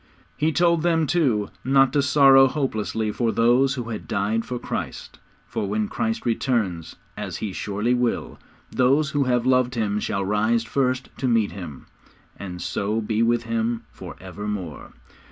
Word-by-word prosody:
He 155 Hz, +1 st, +1 dB
told 170 Hz, 0 st, +3 dB
them, 165 Hz, -1 st, +2 dB
too, 130 Hz, -12 st, +1 dB
not 135 Hz, 0 st, +4 dB
to 145 Hz, -, +3 dB
sorrow 135 Hz, -1 st, +6 dB
hopelessly 110 Hz, -6 st, -2 dB
for 115 Hz, +1 st, 0 dB
those 125 Hz, +4 st, +3 dB
who 120 Hz, -3 st, -5 dB
had 110 Hz, -, -6 dB
died 105 Hz, +3 st, -1 dB
for 125 Hz, -, -4 dB
Christ, -, -, -6 dB, 0.3 s
for 100 Hz, -, -3 dB
when 105 Hz, 0 st, 0 dB
Christ 110 Hz, +2 st, -2 dB
returns, 110 Hz, -, -1 dB, 0.2 s
as -, -, -5 dB
He 105 Hz, -3 st, -4 dB
surely 105 Hz, +6 st, -1 dB
will, 125 Hz, -1 st, -1 dB, 0.3 s
those 140 Hz, +4 st, +2 dB
who 145 Hz, -2 st, +1 dB
have 125 Hz, -1 st, +1 dB
loved 130 Hz, -1 st, +2 dB
Him 105 Hz, -2 st, 0 dB
shall 100 Hz, -2 st, -2 dB
rise 110 Hz, +3 st, +1 dB
first 130 Hz, +2 st, -1 dB
to 130 Hz, -, 0 dB
meet 115 Hz, -4 st, +2 dB
Him, 85 Hz, -7 st, -9 dB, 0.5 s
and 90 Hz, -3 st, -7 dB
so 105 Hz, +3 st, -1 dB
be 110 Hz, 0 st, -1 dB
with 120 Hz, 0 st, +2 dB
Him 115 Hz, 0 st, -1 dB
for -, -, -10 dB
evermore. 95 Hz, -2 st, -6 dB
115 Hz, 160 wpm, -23 LUFS, 105-130 Hz, 0.5 s, sorrow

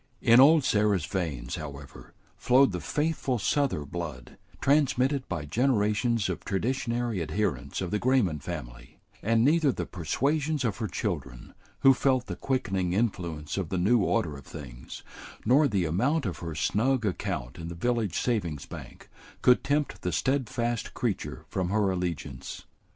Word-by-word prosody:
In 115 Hz, +1 st, +6 dB
old 150 Hz, +3 st, +7 dB
Sarah's 105 Hz, -7 st, +2 dB
veins, 75 Hz, -11 st, -3 dB
however, 70 Hz, -3 st, -9 dB, 0.2 s
flowed 130 Hz, -1 st, +4 dB
the 90 Hz, -, -3 dB
faithful 145 Hz, -, -1 dB
Souther 125 Hz, -, 0 dB
blood, 75 Hz, -6 st, -7 dB, 0.2 s
transmitted 135 Hz, -1 st, +2 dB
by 80 Hz, -6 st, -3 dB
generations 110 Hz, -, +1 dB
of 90 Hz, -3 st, -4 dB
traditionary 120 Hz, 0 st, -1 dB
adherents 75 Hz, -7 st, -2 dB
of 90 Hz, -2 st, -3 dB
the 105 Hz, -, 0 dB
Grayman 120 Hz, -, +2 dB
family; -, -, -8 dB, 0.2 s
and 115 Hz, +2 st, +3 dB
neither 155 Hz, -1 st, +4 dB
the -, -, -4 dB
persuasions 140 Hz, -, -1 dB
of 110 Hz, -4 st, -1 dB
her 110 Hz, -, -2 dB
children, 75 Hz, -, -4 dB, 0.3 s
who 135 Hz, -, +8 dB
felt 130 Hz, -1 st, +1 dB
the -, -, -5 dB
quickening 95 Hz, -9 st, -1 dB
influence 85 Hz, -8 st, -2 dB
of 95 Hz, -5 st, -2 dB
the 95 Hz, -, -1 dB
new 105 Hz, +7 st, +3 dB
order 100 Hz, -6 st, 0 dB
of 70 Hz, -, -12 dB
things, 65 Hz, -6 st, -9 dB, 0.4 s
nor 140 Hz, +6 st, +5 dB
the 100 Hz, -8 st, 0 dB
amount 125 Hz, -, +1 dB
of 95 Hz, -, -3 dB
her 85 Hz, -3 st, -5 dB
snug 115 Hz, -, +1 dB
account 80 Hz, -6 st, -3 dB
in 85 Hz, -, -6 dB
the 85 Hz, -, -6 dB
village 110 Hz, 0 st, 0 dB
savings 90 Hz, -, -1 dB
bank, -, -, -10 dB, 0.4 s
could 125 Hz, -, +5 dB
tempt 145 Hz, +1 st, -1 dB
the 90 Hz, -, -1 dB
steadfast 120 Hz, -, -1 dB
creature -, -, -3 dB
from 90 Hz, -2 st, -1 dB
her 100 Hz, -1 st, +2 dB
allegiance. 90 Hz, -4 st, -4 dB
105 Hz, 150 wpm, -28 LUFS, 85-130 Hz, 0.4 s, who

